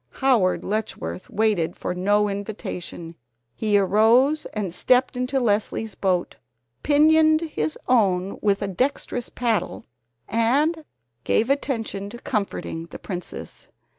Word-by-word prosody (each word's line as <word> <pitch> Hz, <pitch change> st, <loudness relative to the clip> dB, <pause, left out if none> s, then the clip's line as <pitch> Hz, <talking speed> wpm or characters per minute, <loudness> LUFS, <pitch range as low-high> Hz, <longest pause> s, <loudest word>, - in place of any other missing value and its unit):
Howard 240 Hz, -9 st, +2 dB
Letchworth 140 Hz, -, -4 dB
waited 210 Hz, -7 st, +1 dB
for -, -, -3 dB
no 205 Hz, +3 st, +2 dB
invitation. 195 Hz, -4 st, -6 dB, 0.4 s
He 210 Hz, -, +2 dB
arose 225 Hz, +9 st, +3 dB
and 200 Hz, -5 st, -4 dB
stepped 250 Hz, +6 st, +2 dB
into 250 Hz, +2 st, 0 dB
Leslie's 220 Hz, -1 st, 0 dB
boat, 185 Hz, -3 st, -1 dB, 0.4 s
pinioned 310 Hz, +1 st, +4 dB
his 155 Hz, -, -3 dB
own 195 Hz, -6 st, +2 dB
with 205 Hz, -1 st, +1 dB
a -, -, -1 dB
dextrous 245 Hz, +3 st, -2 dB
paddle, 235 Hz, -3 st, -2 dB, 0.4 s
and 285 Hz, +9 st, +1 dB, 0.4 s
gave 230 Hz, +5 st, +2 dB
attention 225 Hz, -8 st, -2 dB
to 240 Hz, -, -9 dB
comforting 200 Hz, -8 st, -3 dB
the -, -, -9 dB
princess. 180 Hz, -3 st, -7 dB
215 Hz, 115 wpm, -23 LUFS, 195-255 Hz, 0.4 s, pinioned